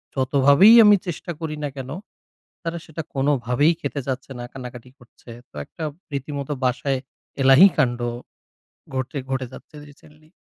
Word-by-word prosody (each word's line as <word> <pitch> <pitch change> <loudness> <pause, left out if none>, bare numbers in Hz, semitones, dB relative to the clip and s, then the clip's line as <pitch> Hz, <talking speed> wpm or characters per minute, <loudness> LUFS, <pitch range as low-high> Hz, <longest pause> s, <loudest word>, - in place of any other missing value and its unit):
যতভাবেই 140 - +6
আমি 210 0 +8
চেষ্টা 175 +1 -5
করি 155 -1 -4
না - - -2
কেন 130 0 -6 0.7
তারা 170 0 -4
সেটা 160 0 -6
কোনভাবেই 135 +2 +2
খেতে 140 -1 -3
চাচ্ছে 130 0 -4
না। 120 - -6
কান্নাকাটি 125 -1 -9
করছে। 120 0 -18 0.2
তো - - -61
একটা 160 - -8 0.3
রীতিমতো 140 +1 -4
বাসায় 130 +1 0 0.4
এলাহি 135 +9 +8
কান্ড 120 -1 +1 0.9
ঘটে 130 +2 -3
ঘটে 130 -1 -1
যাচ্ছে - - -13
রিসেন্টলি। 155 +2 -20
140 Hz, 140 wpm, -22 LUFS, 130-155 Hz, 0.9 s, আমি